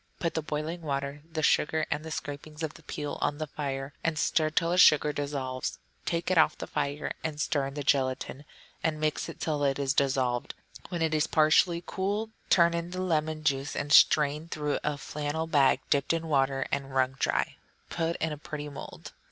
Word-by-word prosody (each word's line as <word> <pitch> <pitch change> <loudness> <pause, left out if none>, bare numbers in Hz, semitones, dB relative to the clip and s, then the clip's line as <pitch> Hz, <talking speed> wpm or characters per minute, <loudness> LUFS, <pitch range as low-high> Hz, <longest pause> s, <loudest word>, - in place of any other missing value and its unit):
Put 170 - -1
the 160 - -1
boiling 155 +3 -4
water, 140 -1 -3
the 160 -1 -2
sugar, 155 +1 +3
and 150 0 -1
the 160 - -7
scrapings 150 +1 -6
of 155 -1 -2
the - - -15
peel 145 -1 -5
on 145 - 0
the 155 - -2
fire, 140 -1 -4
and 165 -1 0
still 155 -1 +2
till 165 +2 +1
the 180 - +2
sugar 150 -3 +6
dissolves. 140 -3 -3 0.3
Take 170 +1 0
it 180 - +4
off 155 -1 +4
the - - -5
fire 145 +1 -2
and 155 -2 -3
stir 145 -2 0
in 135 - -8
the 145 - -3
gelatine, 135 +1 0 0.4
and 155 -1 0
mix 155 0 -1
till 155 -2 -1
this 140 -2 +1
is 140 -1 0
dissolved; 130 -3 0 0.3
when 170 -3 -1
it 160 -1 +1
is 155 +1 +2
partly 170 +2 +4
cool, 205 +4 -2 0.2
turn 170 -1 +5
in 170 0 -2
the 185 +1 -5
lemon 155 -3 0
juice 140 -1 0
and 145 +1 -1
strain 150 +1 +5
through 150 -3 -2
a 150 -1 -1
flannel 150 +2 -3
bag 140 -4 +3
dipped 140 +1 +2
in 165 0 -2
water 135 -2 +1
and 135 -1 -3
wrung 130 -1 +3
dry. - - 0 0.3
Put 165 0 -1
in 160 - -2
a 150 - -5
pretty 150 -1 -6
mould. 140 - -9
150 Hz, 200 wpm, -29 LUFS, 140-160 Hz, 0.4 s, sugar